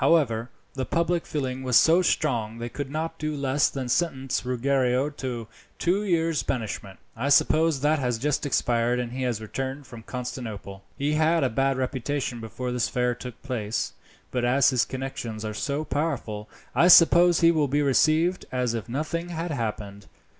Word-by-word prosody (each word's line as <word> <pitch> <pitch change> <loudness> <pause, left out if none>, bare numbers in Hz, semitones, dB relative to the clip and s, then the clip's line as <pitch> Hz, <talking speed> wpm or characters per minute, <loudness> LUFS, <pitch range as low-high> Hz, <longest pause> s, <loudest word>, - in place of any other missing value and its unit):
However, 130 -7 +2 0.2
the 130 - -3
public 170 0 0
feeling 130 -3 -3
was 125 -2 +3
so 165 +3 +5
strong 120 -10 0
that 115 - -6
they 120 - -3
could 140 +2 -5
not 160 +2 -4
do 155 0 -2
less 140 0 +1
than 130 -2 -4
sentence 135 -1 0
Ruggiero 130 +2 +1
to 125 -6 -5 0.3
two 190 +4 +1
years' 165 -5 +1
banishment. 105 -5 -4 0.2
I 135 +5 -2
suppose 155 +1 +3
that 150 +2 +2
has 125 -3 0
just 145 +4 -1
expired, 120 -3 +1
and 120 -1 -3
he 130 +1 -5
has 125 -4 -1
returned 135 +5 -5
from 120 -3 -11
Constantinople. 110 -6 -6
He 145 +2 0
had 160 +1 +3
a 130 - +2
bad 135 +3 +1
reputation 130 -1 -2
before 115 +3 -5
this 125 -1 0
affair 125 0 0
took 125 0 -9
place, 115 -5 -2 0.4
but 125 -1 -1
as 130 +2 +4
his 125 -2 +2
connections 120 -5 -5
are 105 - -3
so 140 +7 -2
powerful, 125 -10 -3 0.2
I 175 - +4
suppose 175 0 +7
he 165 0 +6
will 155 -3 +1
be 145 +2 +1
received 155 +7 +2
as 125 -2 0
if 115 -1 -5
nothing 155 +6 -3
had 170 0 -4
happened. 105 -5 -4
130 Hz, 175 wpm, -26 LUFS, 120-155 Hz, 0.4 s, suppose